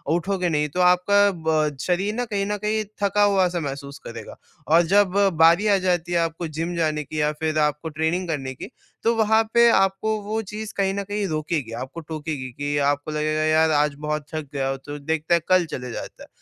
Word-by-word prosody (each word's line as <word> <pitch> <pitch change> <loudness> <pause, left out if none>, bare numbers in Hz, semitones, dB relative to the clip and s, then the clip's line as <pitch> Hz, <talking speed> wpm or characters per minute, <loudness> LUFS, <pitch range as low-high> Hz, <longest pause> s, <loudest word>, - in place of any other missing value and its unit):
उठोगे 180 0 -1
नहीं 150 -1 0
तो 180 - -5
आपका 190 +3 +4 0.2
ब 155 -2 +1
शरीर 190 +3 0
ना 245 +1 -1
कहीं 200 -3 -2
न 210 +1 -2
कहीं 215 +1 0 0.2
थका 205 +1 +3
हुआ 195 -3 +4
सा 175 -1 -3
महसूस 140 -1 -6
करेगा - - -8 0.3
और 165 +2 +5
जब 205 -2 +5 0.3
बारी 170 +6 +5
आ 200 -1 +4
जाती 175 -2 -1
है 175 - +2
आपको 165 0 -2
जिम 165 +3 -4
जाने 155 -2 0
की 150 +2 -4
या 150 - +2
फिर 155 0 -1
आपको 150 +2 0
ट्रेनिंग 160 +4 -1
करने 135 -4 -3
की, 165 - -8 0.3
तो 230 +1 +2
वहाँ 220 0 +3
पे 235 0 +6
आपको 195 +1 +2
वो 215 +2 -2
चीज़ 215 +1 -7
कहीं 195 -1 +1
न 200 0 -3
कहीं 205 0 -2
रोकेगी, 155 -6 -2
आपको 130 +6 -9
टोकेगी 155 -4 -5
कि 145 +4 -3
आपको 145 +1 -2
लगेगा, 155 0 -1
"यार 155 0 +3
आज 150 -1 +2
बहुत 150 -1 -2
थक 155 -2 -4
गया 135 -1 -1
हूँ 135 - -2
तो 145 0 -6
देखते 160 +3 -1
हैं, 170 - +4
कल 185 -1 +4
चले 125 -1 -5
जाता - - -8
है।" - - -14
165 Hz, 215 wpm, -23 LUFS, 150-195 Hz, 0.3 s, पे